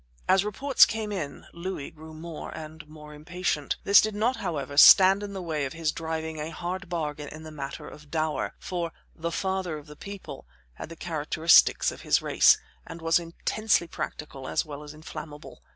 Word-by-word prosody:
As 190 Hz, 0 st, +4 dB
reports 260 Hz, +7 st, +4 dB
came 220 Hz, -1 st, -3 dB
in 155 Hz, -8 st, -5 dB
Louis 170 Hz, -4 st, -5 dB
grew 160 Hz, 0 st, -12 dB
more 160 Hz, 0 st, -7 dB
and 155 Hz, 0 st, -9 dB
more 150 Hz, -1 st, -12 dB
impatient. 155 Hz, -1 st, -2 dB
This 200 Hz, 0 st, +7 dB
did 215 Hz, -1 st, -2 dB
not, 235 Hz, +5 st, +1 dB
however, 150 Hz, -6 st, -4 dB
stand 190 Hz, +6 st, +8 dB
in 205 Hz, -1 st, -6 dB
the 190 Hz, -2 st, -5 dB
way 155 Hz, -4 st, -2 dB
of 135 Hz, -, -5 dB
his 165 Hz, -2 st, -1 dB
driving 160 Hz, -1 st, -4 dB
a 150 Hz, +1 st, -4 dB
hard 180 Hz, +2 st, -5 dB
bargain 150 Hz, -3 st, -3 dB
in 155 Hz, +2 st, -10 dB
the 155 Hz, -, -9 dB
matter 140 Hz, -2 st, -7 dB
of 150 Hz, -1 st, -13 dB
dower, 155 Hz, 0 st, -2 dB
for 175 Hz, -2 st, -4 dB, 0.2 s
"The 170 Hz, +1 st, -4 dB
Father 190 Hz, -3 st, -2 dB
of 150 Hz, -, -11 dB
the 150 Hz, -1 st, -12 dB
People" 200 Hz, +4 st, -9 dB, 0.3 s
had -, -, -9 dB
the 165 Hz, -, -9 dB
characteristics 160 Hz, 0 st, +3 dB
of -, -, -11 dB
his -, -, +3 dB
race, -, -, +5 dB, 0.3 s
and 170 Hz, -, -8 dB
was 165 Hz, +1 st, +3 dB
intensely 175 Hz, +3 st, 0 dB
practical 145 Hz, -4 st, -6 dB
as -, -, 0 dB
well 145 Hz, -1 st, -8 dB
as 150 Hz, 0 st, -10 dB
inflammable. 155 Hz, -1 st, -10 dB
165 Hz, 185 wpm, -27 LUFS, 150-185 Hz, 0.3 s, stand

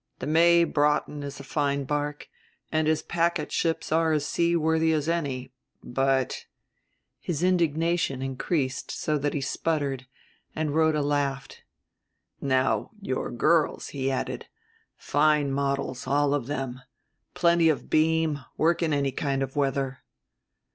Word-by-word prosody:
The -, -, -5 dB
May 170 Hz, +2 st, +5 dB
Broughton 150 Hz, -1 st, +1 dB
is 140 Hz, 0 st, -7 dB
a -, -, -8 dB
fine 140 Hz, 0 st, -1 dB
barque, 145 Hz, +1 st, -3 dB, 0.4 s
and 155 Hz, 0 st, +1 dB
his 155 Hz, 0 st, +1 dB
packet 170 Hz, -2 st, 0 dB
ships 165 Hz, -2 st, -1 dB
are 160 Hz, 0 st, +3 dB
as 150 Hz, -2 st, 0 dB
seaworthy 160 Hz, -1 st, +2 dB
as 155 Hz, -1 st, -1 dB
any, 140 Hz, -7 st, -2 dB, 0.3 s
but 135 Hz, +1 st, 0 dB, 0.3 s
" -, -, -49 dB, 0.3 s
his 170 Hz, -1 st, -3 dB
indignation 165 Hz, -5 st, +1 dB
increased 135 Hz, 0 st, -2 dB
so 150 Hz, -1 st, -1 dB
that 145 Hz, +1 st, -1 dB
he 145 Hz, -, -1 dB
sputtered, 140 Hz, -3 st, -2 dB, 0.5 s
and 155 Hz, -2 st, -1 dB
Rhoda 160 Hz, -1 st, +2 dB
laughed. 140 Hz, -2 st, -2 dB, 0.8 s
"Now 130 Hz, -1 st, +1 dB
your 130 Hz, -10 st, -3 dB
girls," 155 Hz, +6 st, +1 dB
he 135 Hz, -1 st, -2 dB
added, 130 Hz, -, -3 dB, 0.5 s
"fine 150 Hz, -1 st, +2 dB
models, 140 Hz, -3 st, -2 dB
all 145 Hz, +1 st, +2 dB
of 140 Hz, -4 st, -1 dB
them, 135 Hz, -3 st, -4 dB, 0.5 s
plenty 170 Hz, -1 st, +4 dB
of 155 Hz, -, -2 dB
beam, 155 Hz, -2 st, +2 dB
work 170 Hz, +3 st, +2 dB
in 160 Hz, -3 st, +1 dB
any 140 Hz, -1 st, +1 dB
kind 135 Hz, 0 st, -1 dB
of 135 Hz, 0 st, -6 dB
weather." 135 Hz, -2 st, -1 dB
145 Hz, 135 wpm, -26 LUFS, 135-160 Hz, 0.8 s, May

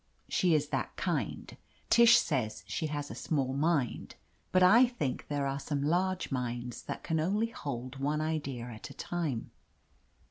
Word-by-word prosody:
She 175 Hz, -3 st, +3 dB
is 150 Hz, -1 st, 0 dB
that -, -, -2 dB
kind. -, -, -2 dB, 0.4 s
Tish 235 Hz, 0 st, +8 dB
says 115 Hz, -8 st, -1 dB
she 160 Hz, -, -2 dB
has 145 Hz, -1 st, -4 dB
a -, -, -5 dB
small 135 Hz, -4 st, -1 dB
mind, 145 Hz, -2 st, 0 dB, 0.4 s
but 185 Hz, 0 st, +5 dB
I 235 Hz, +7 st, +7 dB
think 185 Hz, -, -3 dB
there 145 Hz, -1 st, -1 dB
are 135 Hz, 0 st, -1 dB
some 140 Hz, -1 st, -2 dB
large 180 Hz, +4 st, 0 dB
minds 120 Hz, -2 st, -3 dB
that -, -, -6 dB
can 160 Hz, -1 st, 0 dB
only 205 Hz, +8 st, +1 dB
hold 130 Hz, -, -5 dB
one 145 Hz, +2 st, 0 dB
idea 150 Hz, -6 st, -2 dB
at 115 Hz, -2 st, -8 dB
a -, -, -12 dB
time. 160 Hz, -10 st, -3 dB
145 Hz, 165 wpm, -31 LUFS, 130-175 Hz, 0.4 s, Tish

